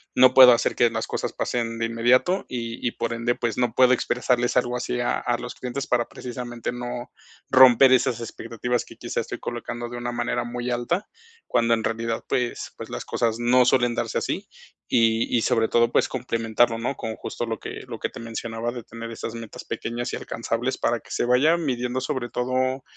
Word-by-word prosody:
no 130 Hz, 0 st, +7 dB
puedo 130 Hz, -1 st, +10 dB
hacer 120 Hz, -, +1 dB
que 120 Hz, -, +4 dB
las 110 Hz, 0 st, -3 dB
cosas -, -, -3 dB
pasen 115 Hz, -1 st, -2 dB
de 115 Hz, -, +1 dB
inmediato 125 Hz, +11 st, +2 dB
y 115 Hz, -1 st, -5 dB
y -, -, 0 dB
por 115 Hz, 0 st, -2 dB
ende, 115 Hz, +1 st, 0 dB
pues, 120 Hz, -3 st, -2 dB
no 125 Hz, -2 st, +1 dB
puedo 130 Hz, 0 st, +6 dB
expresarles 125 Hz, 0 st, +1 dB
algo 125 Hz, 0 st, +1 dB
así 125 Hz, 0 st, -3 dB
a 120 Hz, -, 0 dB
a 120 Hz, -1 st, 0 dB
los 125 Hz, -, -7 dB
clientes 130 Hz, +3 st, -4 dB
para 120 Hz, -1 st, +1 dB
precisamente 120 Hz, -1 st, -5 dB
no, 120 Hz, 0 st, -6 dB, 0.4 s
romper 130 Hz, 0 st, +8 dB
esas 120 Hz, -2 st, +2 dB
expectativas 120 Hz, +1 st, -3 dB
que -, -, -13 dB
quizá -, -, -3 dB
estoy -, -, -6 dB
colocando 120 Hz, 0 st, -5 dB
de 120 Hz, -, -6 dB
una 120 Hz, 0 st, -3 dB
manera 120 Hz, 0 st, -1 dB
muy 120 Hz, +1 st, -4 dB
alta, 145 Hz, -, -1 dB, 0.4 s
cuando 115 Hz, 0 st, +2 dB
en 110 Hz, -1 st, 0 dB
realidad, 115 Hz, 0 st, -2 dB
pues 125 Hz, -1 st, -2 dB
pues, -, -, -8 dB
las -, -, -5 dB
cosas 115 Hz, -1 st, -1 dB
no 125 Hz, +1 st, +4 dB
suelen 120 Hz, -1 st, +3 dB
darse -, -, -1 dB
así. -, -, -3 dB, 0.4 s
Y 115 Hz, 0 st, +2 dB
y -, -, +2 dB
sobre 110 Hz, 0 st, +2 dB
todo, 120 Hz, 0 st, +3 dB
pues, -, -, +3 dB
complementarlo, 115 Hz, -2 st, +1 dB
¿no? 125 Hz, +4 st, -2 dB
Con 110 Hz, -1 st, -4 dB
justo 120 Hz, -, -5 dB
lo 115 Hz, -, -2 dB
que -, -, -7 dB
lo -, -, -6 dB
que -, -, -2 dB
te -, -, -10 dB
mencionaba 115 Hz, 0 st, -4 dB
de 120 Hz, -2 st, -7 dB
tener 115 Hz, 0 st, -8 dB
esas 115 Hz, 0 st, -6 dB
metas 115 Hz, -2 st, -8 dB
pequeñas 120 Hz, +1 st, -4 dB
y -, -, -1 dB
alcanzables 115 Hz, +2 st, -3 dB
para 120 Hz, -1 st, 0 dB
que -, -, -20 dB
se -, -, 0 dB
vaya 135 Hz, +7 st, +4 dB
midiendo 130 Hz, -5 st, -2 dB
sobre 130 Hz, -3 st, -3 dB
todo, 130 Hz, +1 st, -1 dB
120 Hz, 205 wpm, -24 LUFS, 115-125 Hz, 0.4 s, puedo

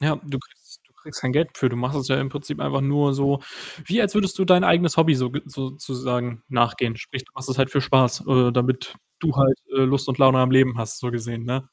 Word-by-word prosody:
Ja, 155 Hz, +1 st, +1 dB
du 140 Hz, -3 st, -7 dB
kriegst -, -, -18 dB
du -, -, -36 dB
kriegst -, -, -9 dB
kein 130 Hz, -, -2 dB
Geld 155 Hz, +4 st, +1 dB
dafür. 130 Hz, -, +1 dB
Du 120 Hz, -, -5 dB
machst 125 Hz, +4 st, -2 dB
es 130 Hz, -, -4 dB
ja 130 Hz, -, +1 dB
im 135 Hz, -, -2 dB
Prinzip 145 Hz, +1 st, -7 dB
einfach 135 Hz, -, -1 dB
nur 140 Hz, 0 st, +1 dB
so 140 Hz, 0 st, 0 dB, 0.4 s
wie 215 Hz, +7 st, +1 dB
als 205 Hz, -2 st, +1 dB
würdest 195 Hz, -2 st, 0 dB
du 190 Hz, -, +2 dB
dein 180 Hz, -1 st, +5 dB
eigenes 170 Hz, -2 st, +3 dB
Hobby 165 Hz, -2 st, +5 dB
soge 130 Hz, +3 st, -2 dB
sozusagen 130 Hz, -3 st, -5 dB
nachgehen. 120 Hz, -2 st, 0 dB
Sprich, 130 Hz, +3 st, -8 dB
du -, -, -27 dB
machst 130 Hz, +1 st, -8 dB
es 130 Hz, +1 st, -3 dB
halt 135 Hz, 0 st, +2 dB
für 140 Hz, -, +1 dB
Spaß, 130 Hz, -2 st, +2 dB
äh, 125 Hz, -2 st, +3 dB
damit 125 Hz, +1 st, -1 dB, 0.2 s
du 160 Hz, -3 st, 0 dB
halt, 135 Hz, -1 st, +4 dB, 0.2 s
äh, 135 Hz, -, +3 dB
Lust 135 Hz, +1 st, +1 dB
und 130 Hz, -, -2 dB
Laune 130 Hz, -1 st, +6 dB
am 130 Hz, 0 st, +3 dB
Leben 130 Hz, -2 st, +4 dB
hast, 115 Hz, -1 st, -4 dB
so 125 Hz, -, -4 dB
gesehen, 115 Hz, -1 st, -5 dB
ne? 130 Hz, +2 st, -4 dB
135 Hz, 245 wpm, -22 LUFS, 125-145 Hz, 0.4 s, Laune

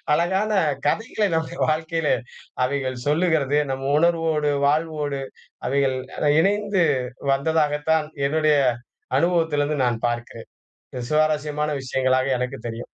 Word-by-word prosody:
அழகான 190 Hz, +4 st, +1 dB, 0.3 s
கதைகளை 220 Hz, +2 st, 0 dB
நம்ம 160 Hz, +1 st, -3 dB
வாழ்க்கையிலே 160 Hz, 0 st, 0 dB, 0.5 s
அவைகள் 130 Hz, -1 st, -2 dB
சொல்லுகிறது. 150 Hz, -3 st, +2 dB
நம்ம 135 Hz, +1 st, -2 dB
உணர்வோடு, 165 Hz, -3 st, +2 dB, 0.2 s
வாழ்வோடு, 150 Hz, -2 st, -1 dB, 0.5 s
அவைகள் 135 Hz, -1 st, +1 dB, 0.4 s
இணைந்து 200 Hz, -1 st, +2 dB, 0.5 s
வந்ததாகத்தான் 150 Hz, +1 st, +1 dB, 0.2 s
என்னுடைய 155 Hz, 0 st, +2 dB, 0.6 s
அனுபவத்திலேருந்து 155 Hz, -5 st, +1 dB
நான் 120 Hz, -1 st, -1 dB
பார்க்கிறேன். 120 Hz, -1 st, -6 dB, 0.4 s
இது 125 Hz, -2 st, -5 dB
சுவாரஸ்யமான 150 Hz, -1 st, +1 dB
விஷயங்களா 130 Hz, 0 st, +1 dB, 0.2 s
எனக்கு 125 Hz, +2 st, -3 dB
தெரியும். 115 Hz, 0 st, -5 dB
150 Hz, 95 wpm, -23 LUFS, 135-165 Hz, 0.6 s, சொல்லுகிறது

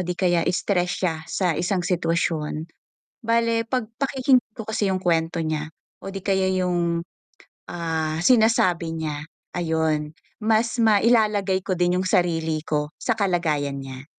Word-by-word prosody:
'di 180 Hz, 0 st, -3 dB
kaya 175 Hz, -2 st, +2 dB
stress 180 Hz, -1 st, 0 dB
siya 165 Hz, -3 st, +1 dB
sa 180 Hz, -3 st, +1 dB
isang 180 Hz, +2 st, -1 dB
sitwasyon. 165 Hz, -3 st, -1 dB, 0.6 s
Bale 230 Hz, 0 st, +2 dB
'pag 240 Hz, -2 st, -2 dB
pakikinggan 260 Hz, -4 st, +2 dB
ko 220 Hz, -, -6 dB
kasi 220 Hz, -1 st, 0 dB
'yong 185 Hz, -, 0 dB
kuwento 165 Hz, -1 st, +1 dB
niya, 155 Hz, -1 st, -2 dB, 0.3 s
o 195 Hz, -, -6 dB
'di 195 Hz, -, -5 dB
kaya 190 Hz, -1 st, +1 dB
'yong, 175 Hz, -2 st, 0 dB, 0.7 s
ah, 160 Hz, -2 st, -2 dB
sinasabi 185 Hz, -9 st, +3 dB
niya, 150 Hz, -2 st, -4 dB, 0.3 s
ayun, 160 Hz, -3 st, 0 dB, 0.3 s
mas 225 Hz, +2 st, +1 dB
mailalagay 210 Hz, -3 st, +3 dB
ko 190 Hz, -, 0 dB
din 175 Hz, 0 st, +2 dB
'yong 185 Hz, -, -2 dB
sarili 165 Hz, -3 st, +1 dB
ko 150 Hz, 0 st, -2 dB
sa 235 Hz, -, +1 dB
kalagayan 160 Hz, -8 st, 0 dB
niya. 135 Hz, 0 st, -8 dB
175 Hz, 140 wpm, -23 LUFS, 160-210 Hz, 0.7 s, sinasabi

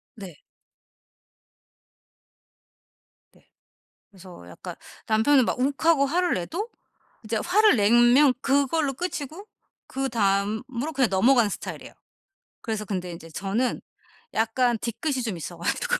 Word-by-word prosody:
네. 190 Hz, -8 st, -10 dB, 2.9 s
네. -, -, -27 dB, 0.6 s
그래서 185 Hz, -, -14 dB
약간 85 Hz, -, -9 dB, 0.3 s
남편은 230 Hz, +5 st, +4 dB
막 -, -, -2 dB
욱하고 280 Hz, +2 st, +2 dB
화를 350 Hz, +5 st, +1 dB
내도 340 Hz, -, -4 dB, 0.6 s
이제 220 Hz, +1 st, -1 dB
화를 420 Hz, +4 st, +4 dB
내면 240 Hz, +6 st, +5 dB
그걸로 280 Hz, +1 st, +1 dB
끝이고 335 Hz, +3 st, -5 dB, 0.4 s
그 270 Hz, 0 st, -3 dB
다음으로 220 Hz, +6 st, -1 dB
그냥 265 Hz, -4 st, +2 dB
넘어가는 230 Hz, +3 st, +4 dB
스타일이에요. -, -, -7 dB, 0.7 s
그래서 220 Hz, -2 st, -3 dB
근데 185 Hz, -3 st, -4 dB
인제 165 Hz, -1 st, -11 dB
저는 200 Hz, +9 st, -2 dB, 0.5 s
약간 235 Hz, +2 st, +1 dB
뒤끝이 255 Hz, +5 st, -2 dB
좀 210 Hz, -7 st, -3 dB
있어 170 Hz, +2 st, -7 dB
가지고 -, -, -1 dB
240 Hz, 250 characters per minute, -25 LUFS, 205-285 Hz, 2.9 s, 내면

